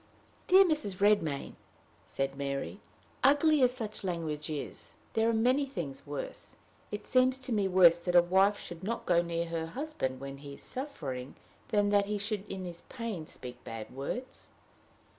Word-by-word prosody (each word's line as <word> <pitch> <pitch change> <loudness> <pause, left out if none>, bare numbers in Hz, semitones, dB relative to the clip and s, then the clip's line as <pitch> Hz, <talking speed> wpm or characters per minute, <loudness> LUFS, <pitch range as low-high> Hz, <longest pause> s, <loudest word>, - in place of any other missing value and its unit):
"Dear 380 +1 +8
Mrs. 305 - 0
Redmain," 195 -8 +2 0.5
said 135 0 -2
Mary, 140 +7 -3 0.4
"ugly 290 +2 +5
as 250 -1 +5
such 220 -5 -5
language 160 -5 -3
is, 150 -2 -6 0.2
there 225 +1 +3
are - - +4
many 250 +5 +3
things 165 - -6
worse. 145 -1 -6 0.3
It 210 - -5
seems 255 0 +3
to 260 -2 -4
me 205 -3 +2
worse 180 -2 +6
that 175 +1 -2
a 175 - +10
wife 195 +3 +3
should 175 +1 -8
not 230 +4 -3
go 170 -1 +4
near 170 0 -2
her 165 -1 -3
husband 165 - -3
when 135 0 -7
he 140 -1 -9
is - - -11
suffering 145 - -5 0.3
than 205 -1 +2
that 200 -1 +3
he 210 0 -1
should 205 0 -3
in 190 -1 -5
his 170 -1 -8
pain 225 -10 -5
speak 125 -1 -9
bad 115 +1 -7
words." 240 - -5
190 Hz, 170 wpm, -31 LUFS, 150-230 Hz, 0.5 s, a